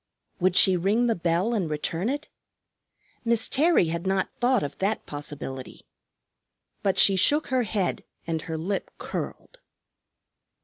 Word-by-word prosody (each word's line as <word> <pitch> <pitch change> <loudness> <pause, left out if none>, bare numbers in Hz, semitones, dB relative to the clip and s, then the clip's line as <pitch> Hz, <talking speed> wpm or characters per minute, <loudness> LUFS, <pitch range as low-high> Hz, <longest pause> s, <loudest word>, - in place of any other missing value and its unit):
Would 185 0 +2
she 190 0 +7
ring 205 +7 +1
the 235 - +2
bell 175 +6 0
and 190 -8 -1
return 165 +6 -2
it? 290 +3 -3 1.0
Miss 230 -1 +2
Terry 295 - +3
had 170 +3 -3
not 190 0 0
thought 245 -2 +1
of 145 - -5
that 200 +3 -1
possibility. 145 -3 -7 1.0
But 195 -2 0
she 195 - +6
shook 290 - +3
her 260 -1 +2
head 205 -5 -2 0.2
and 165 -1 -2
her 160 -1 -5
lip 190 +5 -3
curled. - - -6
190 Hz, 140 wpm, -26 LUFS, 165-235 Hz, 1.0 s, she